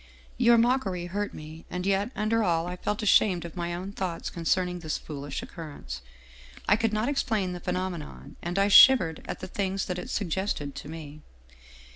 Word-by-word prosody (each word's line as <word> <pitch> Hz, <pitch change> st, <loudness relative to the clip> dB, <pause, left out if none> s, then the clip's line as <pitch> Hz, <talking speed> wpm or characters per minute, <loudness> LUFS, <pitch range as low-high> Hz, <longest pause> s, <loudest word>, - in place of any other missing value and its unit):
Your 240 Hz, -1 st, +6 dB
mockery 230 Hz, -7 st, +1 dB
hurt 205 Hz, +4 st, -3 dB
me, 155 Hz, +1 st, -10 dB
and 180 Hz, 0 st, -4 dB
yet 200 Hz, +2 st, +1 dB
under 220 Hz, +1 st, +1 dB
all 165 Hz, -3 st, +1 dB
I 180 Hz, 0 st, -4 dB
felt 210 Hz, +4 st, -3 dB
ashamed 190 Hz, -4 st, +4 dB
of 170 Hz, -, -8 dB
my 175 Hz, -1 st, -3 dB
own 185 Hz, +3 st, -5 dB
thoughts 185 Hz, -4 st, -4 dB
concerning 180 Hz, +1 st, 0 dB
this 160 Hz, -3 st, -2 dB
foolish 145 Hz, -2 st, -6 dB
occurrence. 145 Hz, -, -8 dB, 0.7 s
I -, -, +6 dB
could 225 Hz, 0 st, 0 dB
not 215 Hz, +2 st, 0 dB
explain 220 Hz, -9 st, 0 dB
the 180 Hz, -, -5 dB
phenomenon, 180 Hz, -3 st, -4 dB
and 175 Hz, +2 st, -3 dB
I 195 Hz, 0 st, +4 dB
shivered 195 Hz, -7 st, +7 dB
at -, -, -5 dB
the 185 Hz, -, -5 dB
things 195 Hz, 0 st, -2 dB
that 180 Hz, -1 st, -3 dB
it -, -, -7 dB
suggested 185 Hz, -6 st, -2 dB
to 145 Hz, -, -8 dB
me. 155 Hz, -2 st, -8 dB
180 Hz, 180 wpm, -27 LUFS, 165-205 Hz, 0.7 s, shivered